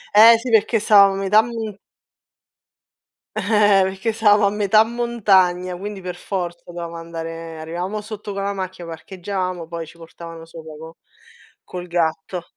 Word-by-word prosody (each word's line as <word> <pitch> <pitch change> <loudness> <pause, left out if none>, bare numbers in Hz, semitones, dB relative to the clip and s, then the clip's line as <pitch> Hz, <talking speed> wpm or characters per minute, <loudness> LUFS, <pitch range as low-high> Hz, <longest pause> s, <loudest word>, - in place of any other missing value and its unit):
Eh, 225 +2 +9
sì, 235 +2 -5
perché 225 +1 +3
stava 200 -2 +6
a - - -4
metà 195 +2 +4
m 225 -2 -5 1.6
Eh, 205 -3 +3
perché 190 +4 -2
stavamo 210 -2 +4
a - - +4
metà 210 +1 +4
montagna, 195 -7 +1
quindi, 200 +2 -7
per 180 -1 -5
forza 175 -1 -4
dovevamo 170 -1 -7
andare 165 -1 -7
arrivavamo 175 +6 -4
sotto 210 -1 -7
con 195 0 -4
la 200 0 -1
macchia, 185 -2 -6
parcheggiavamo, 180 +1 -5
poi 165 -1 -6
ci 170 - -15
portavano 165 0 -11
sopra 160 -1 -11
co 160 +1 -11 0.7
col 180 0 -8
gatto. 170 +1 -2
190 Hz, 150 wpm, -21 LUFS, 170-210 Hz, 1.6 s, Eh